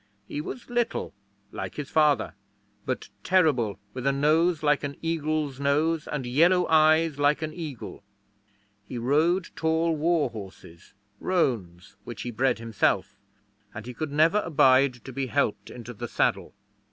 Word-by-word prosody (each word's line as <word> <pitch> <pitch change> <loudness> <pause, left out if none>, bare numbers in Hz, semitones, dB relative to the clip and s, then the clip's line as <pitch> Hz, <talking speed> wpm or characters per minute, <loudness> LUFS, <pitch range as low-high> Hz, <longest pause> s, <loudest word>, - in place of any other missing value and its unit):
He 145 - -4
was 235 +9 -8
little, 240 - -2 0.4
like - - -6
his 145 -2 -6
father, 150 -10 +2 0.5
but 130 - -3
terrible, 145 - +2
with 130 +1 -3
a - - +4
nose 155 +4 +2
like 145 -1 +2
an 140 0 -4
eagle's 155 -4 -1
nose 150 +3 +1
and 145 -4 -4
yellow 170 +8 +3
eyes 155 -1 +4
like 145 +2 +2
an 155 0 -4
eagle. 150 -12 -7 0.9
He 125 - -6
rode 155 +9 +1
tall 160 +1 +1
warhorses 115 - -3 0.3
roans, 100 - -2
which 110 -4 -7
he 120 - -4
bred 130 +4 +1
himself 115 -2 0 0.6
and 105 - -7
he 125 - -7
could 155 +4 -4
never 160 +7 +4
abide 130 - +3
to 130 - -8
be 135 +1 -2
helped 105 -3 -1
into 120 0 -9
the 120 +2 -6
saddle. - - -1
145 Hz, 145 wpm, -26 LUFS, 125-160 Hz, 0.9 s, a